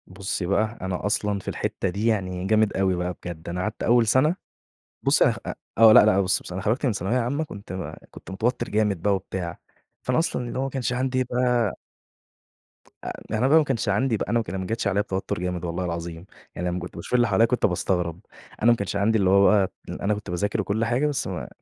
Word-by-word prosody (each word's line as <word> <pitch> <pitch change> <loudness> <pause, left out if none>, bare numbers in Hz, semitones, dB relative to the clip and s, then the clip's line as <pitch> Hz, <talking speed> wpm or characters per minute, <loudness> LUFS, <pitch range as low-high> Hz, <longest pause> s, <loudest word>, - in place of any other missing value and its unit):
بُصّي 95 0 -4
بقى، 110 +5 0
أنا 95 0 -3
أصلًا 105 -1 0
في - - -16
الحتّة 95 - -2
دي 100 +5 -3
يعني 95 -4 -1
جامد 110 -1 +2
أوي 95 -1 +2
بقى 90 +1 -2
بجد. 85 -2 -7
أنا 90 +1 -3
قعدت 105 +2 -3
أول 120 0 +4
سَنة 135 +9 +3 0.7
بُصّي - - +4
أنا - - +3
خ - - -9
أ - - -3 0.2
آه. 110 -1 +8
لأ، - - +8
لأ 100 -2 +4
بُصّي 95 -1 +1
بصراحة 90 - -7
أنا - - -11
خرجت 115 +7 +1
من 125 - +2
ثانوية 100 +5 -1
عامة 130 +6 0
كنت 100 - -10
ما 85 -4 -6
كنت - - -11
متوتّر 115 +6 -1
جامد 105 -4 +1
بقى 100 +2 +2
وبتاع، 95 -2 -5 0.4
فأنا 125 +2 +1
أصلًا 165 -6 -1
اللي 125 - -4
هو - - 0
ما 135 - -2
كانش 125 -2 -2
عندي 130 +1 0
بقى 125 -3 +1 1.3
آآ - - -6 0.2
أنا 125 +4 +2
بقى 145 - +5
وما 160 - +5
كانش 120 -6 -1
عندي 110 +4 +1
بقى - - -4
أنا 120 - +3
وك 110 - -4
ما 95 +1 -3
جاتش 110 +2 -2
عليّا 100 +1 +2
بتوتُّر 95 -3 -3
جامد 90 -1 -3
والله 85 +2 -2
العظيم، 85 0 -5 0.3
يعني 90 - -3
لمّا 90 +1 -1
كنت 90 0 -8
باشوف - - -7
اللي 120 -1 +4
حواليّا 115 - +4
كنت 125 +2 +1
باستغرب. 90 -2 -1 0.4
أنا 120 - +7
ما 120 - +3
كانش 100 -1 -3
عندي 105 +3 +2
اللي 95 -3 +2
هو 100 +1 +6
بقى 100 -3 +3 0.2
اللي - - -6
أنا 105 +2 +2
كنت 105 -1 -6
باذاكر 100 +5 -1
وكل 105 +3 -1
حاجة، 120 +6 +1
بس 145 -2 -1
ما - - -3
ما - - -5
105 Hz, 235 wpm, -24 LUFS, 90-120 Hz, 1.3 s, آه